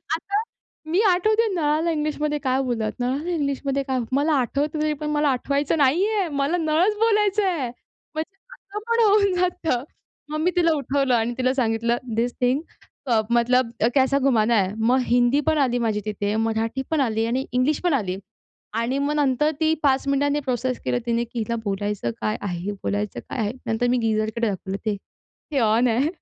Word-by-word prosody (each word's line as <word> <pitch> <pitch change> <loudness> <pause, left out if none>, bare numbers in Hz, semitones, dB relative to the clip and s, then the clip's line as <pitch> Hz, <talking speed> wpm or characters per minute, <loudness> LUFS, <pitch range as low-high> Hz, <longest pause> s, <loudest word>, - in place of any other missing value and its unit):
आता 400 +5 -2 0.5
मी 365 +5 +3
आठवते 430 +5 +3
नळाला 315 0 +1
इंग्लिशमध्ये 300 -1 -1
काय 265 -2 0
बोलतात? 225 -4 -1
नळाला 265 +7 -1
इंग्लिशमध्ये 280 -3 -1
काय? 260 -1 -1
मला 285 +4 +2
आठवत 280 +3 0
नाही 305 0 +1
पण 300 - -2
मला 295 -1 +2
आठवायचं 280 +3 0
नाहीये. 365 +8 +2
मला 285 +3 0
नळच 330 +5 +2
बोलायचंय. 410 - +2 0.5
म्हणजे 320 +5 -4 0.2
असं 405 +2 -8
पण 465 0 +3
होऊन 400 -2 +4
जातं. 325 -8 0 0.5
मग 305 +1 -3
मी 355 +3 +2
तिला 340 -2 +3
उठवलं 275 -3 +1
आणि 230 +1 0
तिला 255 0 +1
सांगितलं 235 -2 +1 0.2
थिस 240 +1 +1
थिंग 250 +4 +2 0.5
अ, 230 -3 +3
मतलब 240 +1 +2 0.2
कैसा 270 0 +4
घुमाना 240 -4 +3
है? 190 +1 -2
मग 240 +4 +3
हिंदी 245 +3 +3
पण 315 -1 +3
आली 255 -4 +2
माझी 210 -2 0
तिथे, 205 0 -2
मराठी 225 +3 -1
पण 320 - +2
आली 225 -2 0
आणि 255 +3 -1
इंग्लिश 255 +4 +1
पण 350 -3 +2
आली. 195 -8 -1 0.6
आणि 230 +4 -1
मग 285 +1 0
नंतर 295 +1 +2
ती 315 0 +3
5 270 -1 +2
मिनिटांनी 285 +1 +1
प्रोसेस 255 -2 -2
केलं - - +1
तिने, 235 0 +1
की 240 0 -6
हिला 235 +1 -2
बोलायचं 200 - -2
काय 110 0 -1
आहे? 180 0 -3
बोलायचं 205 0 -2
काय - - -4
आहे? 210 -2 0
नंतर 225 +2 0
मी 250 - +2
गीझरकडे 220 0 0
दाखवलं 195 -1 -3
ते 215 -1 0 0.6
हे 280 - +1
ऑन 225 +2 +3
आहे. 245 +6 +2
265 Hz, 175 wpm, -23 LUFS, 230-305 Hz, 0.6 s, होऊन